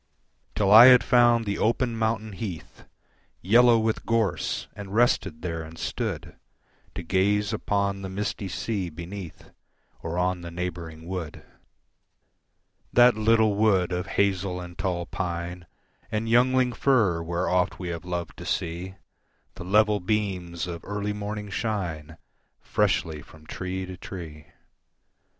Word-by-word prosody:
Till 100 -2 +2
I 115 +4 +11
had 125 -1 +8
found 120 -2 +4
the 100 -1 -2
open 115 +1 +1
mountain 110 -1 -1
heath 95 -6 -7 0.5
Yellow 120 +4 +5
with 110 0 -1
gorse, 110 -8 0
and 100 0 -7
rested 95 -9 +1
there 85 -2 -3
and 80 +1 -10
stood - - -4 0.6
To - - -5
gaze 100 +4 +1
upon 100 -2 -1
the 95 - -5
misty 100 +1 -3
sea 95 0 -3
beneath, 85 +2 -9 0.5
Or 85 +1 -4
on 90 0 0
the 85 - -7
neighbouring 85 -2 -6
wood, 90 -4 -6 1.5
That 120 -1 +6
little 110 0 +3
wood 100 -4 +2
of 90 0 -2
hazel 95 -2 +1
and 90 -1 -9
tall 90 -2 -2
pine 90 -1 -5 0.4
And 110 +1 -2
youngling 125 +2 +3
fir, 110 -12 +2
where 85 +2 -2
oft 90 +1 +1
we 90 -2 -5
have 85 -2 -5
loved 90 -1 -5
to - - -9
see 90 +3 -3 0.6
The - - -9
level 105 +2 +3
beams 90 -4 -2
of 85 -2 -7
early 105 0 -3
morning 105 0 -5
shine 85 -9 -3 0.4
Freshly 80 -2 0
from 80 0 -17
tree 95 +3 -4
to 90 0 -9
tree. 80 -5 -9
95 Hz, 135 wpm, -26 LUFS, 85-110 Hz, 1.5 s, I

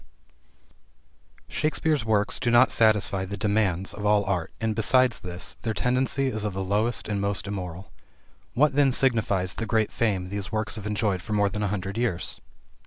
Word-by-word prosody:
VII - - -35
Shakespeare's 155 -2 0
works 105 -2 +1
do 120 - 0
not 120 -1 +5
satisfy 100 -4 +3
the 100 +2 -5
demands 100 -3 0
of 105 - -7
all 105 0 +3
art, 90 -3 -2
and, 110 -1 -1
besides 120 +2 +3
this, 85 -2 -6
their 110 -2 -2
tendency 130 +2 +1
is 110 -5 -2
of 105 -3 -3
the 95 - -2
lowest 105 +5 0
and 100 -1 -2
most 100 -1 -1
immoral. 95 -2 -6 0.6
What 145 +3 +3
then 140 -1 +4
signifies 110 -8 +1
the 115 - -4
great 110 -1 +1
fame 95 -6 -1
these 100 0 -4
works 110 -1 -1
have 105 -2 -6
enjoyed 105 -3 -1
for 105 - -5
more 105 -1 +2
than 105 +2 -4
a 105 - +1
hundred 100 +1 -3
years? 95 -7 -2
105 Hz, 180 wpm, -26 LUFS, 95-115 Hz, 0.6 s, not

